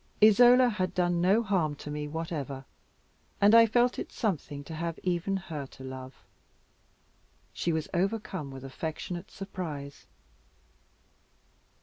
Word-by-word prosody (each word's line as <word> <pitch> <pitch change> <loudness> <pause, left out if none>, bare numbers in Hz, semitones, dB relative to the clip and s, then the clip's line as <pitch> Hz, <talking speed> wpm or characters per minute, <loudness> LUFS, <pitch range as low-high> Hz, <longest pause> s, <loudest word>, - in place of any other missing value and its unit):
Isola 245 +4 +7
had 190 -5 -2
done 175 -1 +1
no 200 +6 +4
harm 180 -8 0
to 150 - -8
me 150 0 -3
whatever, 145 -4 -4 0.7
and 205 +2 +6
I 230 0 +8
felt 245 +2 +2
it - - -5
something 150 - -2
to 160 - -9
have 165 +1 -3
even 185 +2 0
her 155 -7 -6
to 130 - -13
love. 130 0 -9 1.3
She 170 - -1
was 160 -1 -1
overcome 190 -4 -1
with 135 -1 -9
affectionate 160 +6 -5
surprise. 160 -8 -7
170 Hz, 125 wpm, -29 LUFS, 145-200 Hz, 1.3 s, I